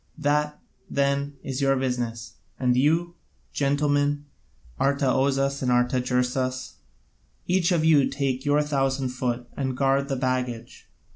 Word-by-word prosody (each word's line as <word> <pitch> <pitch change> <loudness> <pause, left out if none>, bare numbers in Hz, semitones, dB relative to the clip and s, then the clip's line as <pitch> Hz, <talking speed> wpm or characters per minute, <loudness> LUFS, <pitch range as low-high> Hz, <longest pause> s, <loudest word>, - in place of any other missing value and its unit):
That, 150 +1 0 0.3
then, 140 +1 0
is 135 +1 -4
your 135 0 +3
business; 120 -3 -3 0.3
and 125 -1 +2
you, 165 +6 +2 0.4
gentlemen, 145 0 +1 0.5
Artaozus 140 0 +1
and 130 - 0
Artagersas, 125 +1 0 0.7
each 180 0 +2
of 165 -3 +2
you 150 -4 +5
take 135 -2 -2
your 145 +1 +2
thousand 135 -2 0
foot 125 -1 -2
and 130 -2 -2
guard 135 +1 +2
the 135 - 0
baggage. 125 -2 -3
135 Hz, 120 wpm, -25 LUFS, 125-145 Hz, 0.7 s, you